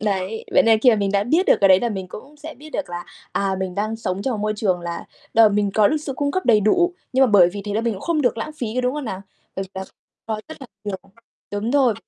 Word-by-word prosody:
Đấy, 200 +1 -2
vậy - - +6
nên 225 -1 +4
khi 250 - +6
mà 225 - +3
mình 200 -1 0
đã 200 0 +2
biết 325 - +2
được - - +6
cái 195 - +5
đấy 190 0 +6
là 240 - 0
mình 190 -4 -5
cũng 275 +10 -11
sẽ 310 +2 -9
biết 300 +5 -13
được 295 -11 -4
là, 175 0 -5 0.3
à, 195 -1 0
mình 185 -1 -3
đang 215 +3 -2
sống 190 -3 -3
trong 265 - -1
một 220 - -3
môi 215 0 0
trường 190 -4 0
là 170 -1 -5 0.3
đ - - -1
mình 205 0 +1
có 210 -2 +5
được 310 - +1
sự 300 -2 -4
cung 285 -1 0
cấp 370 +4 -2
đầy 220 -4 +5
đủ, 350 - +2 0.2
nhưng 260 +1 +4
mà - - +4
bởi 200 -6 +6
vì 200 0 -6
thế 205 -1 -4
là 220 - +1
mình 230 0 0
cũng 190 - -9
không 330 -3 0
được 245 -4 +1
lãng 225 - -4
phí, 245 - -3
có 255 - +1
đúng 250 +1 0
không 300 -2 -4
nào? 195 -5 -5 0.3
Bởi 195 - -1
vì - - -15
là 190 0 -4 0.4
có 220 -1 -3
rất 315 - -10
là 265 - -9 0.2
nhiều 205 -2 -3 0.5
đúng 205 +3 -2
rồi, 260 -4 +3
215 Hz, 305 wpm, -21 LUFS, 195-265 Hz, 0.5 s, vậy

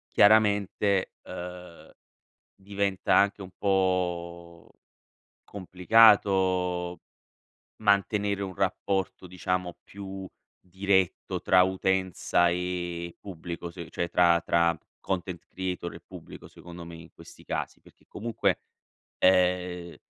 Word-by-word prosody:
chiaramente, 100 -2 +3
ehm, 90 -1 -9 0.6
diventa 100 -1 -1
anche 100 0 +3
un 95 - -10
po' 85 -3 -1 0.7
complicato 95 -3 +3 0.8
mantenere 100 0 +1
un 95 -1 -5
rapporto, 95 0 -2
diciamo, 90 0 -3
più 95 -1 -8 0.3
diretto 95 0 -1
tra 90 -1 +5
utenza 95 -2 +1
e 90 -1 -3
pubblico, 85 -2 -7
se 85 -1 -9
cioè 85 - -2
tra 85 -1 +4
tra 85 0 +2 0.2
content 90 -2 -4
creator 90 -2 -5
e 85 - -11
pubblico, 90 -3 -12
secondo 85 -1 -11
me 85 0 -9
in 85 0 -13
questi - - -15
casi; - - -4
perché - - -22
comunque, 105 -4 -1 0.6
ehm 90 -1 +2
90 Hz, 100 wpm, -27 LUFS, 85-95 Hz, 0.8 s, tra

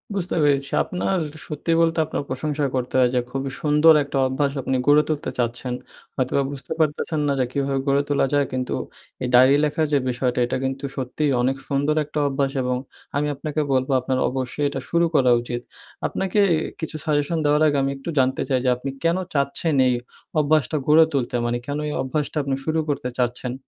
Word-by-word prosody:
বুঝতে 180 -2 -2
পেরেছি 140 -1 +2
আপনার 185 +1 -1 0.3
সত্যি 150 +2 -3
বলতে 165 0 +2
আপনার - - -3
প্রশংসা 145 +2 -1
করতে 125 0 -2
হয়। 125 -1 +5
যে - - +4
খুবই 135 0 -3
সুন্দর 150 +2 +6
একটা 140 0 -4
অভ্যাস 140 +2 0
আপনি 130 - -1
গড়ে 150 +1 +6
তুলতে 150 -1 -2
চাচ্ছেন। 120 +1 -2 0.4
হয়তোবা 130 +2 +1
বুঝতে 140 -1 -8
পারতেছেন 155 +1 0
না 140 - +2
যে, 130 - +2
কীভাবে 135 0 -1
গড়ে 140 +1 +3
তোলা 145 - +2
যায়? 145 -1 +3
কিন্তু 130 -1 -2 0.5
এ - - 0
ডায়রি 130 +3 +7
লেখার 150 +1 +1
যে - - +5
বিষয়টা 125 0 -1
এটা 120 - -2
কিন্তু 135 +1 -3
সত্যিই 135 +3 -1
অনেক 130 +2 +1
সুন্দর 145 +2 +1
একটা 150 +1 -4
অভ্যাস। 135 0 0
এবং 125 0 0 0.4
আমি 150 +1 +1
আপনাকে 155 +2 -2
বলবো 130 +1 +1
আপনার 130 0 -1
অবশ্যই 130 +3 -2
এটা - - -4
শুরু 170 0 +3
করা 130 -3 +5
উচিত। 120 0 -4 0.5
আপনাকে 195 +2 -1
এ - - +4 0.2
কিছু 160 -1 -5
সাজেশন 150 +2 +1
দেওয়ার 150 +1 +3
আগে 145 -1 +1
আমি 135 - 0
একটু 135 +5 -7
জানতে 130 0 +1
চাই 130 -2 +2
যে - - +4
আপনি 130 +2 -5
কেনো 170 +3 +2
চাচ্ছেন 140 +2 +1
এই 125 - +3 0.5
অভ্যাসটা 155 +1 +2
গড়ে 160 +2 +7
তুলতে? 130 -3 -1
মানে 120 0 0
কেনো 145 +1 -3
এই 150 - -3
অভ্যাসটা 150 +3 -2
আপনি 135 -1 -1
শুরু 160 0 +1
করতে 140 -3 -1
চাচ্ছেন? 125 0 -1
140 Hz, 195 wpm, -23 LUFS, 130-150 Hz, 0.5 s, ডায়রি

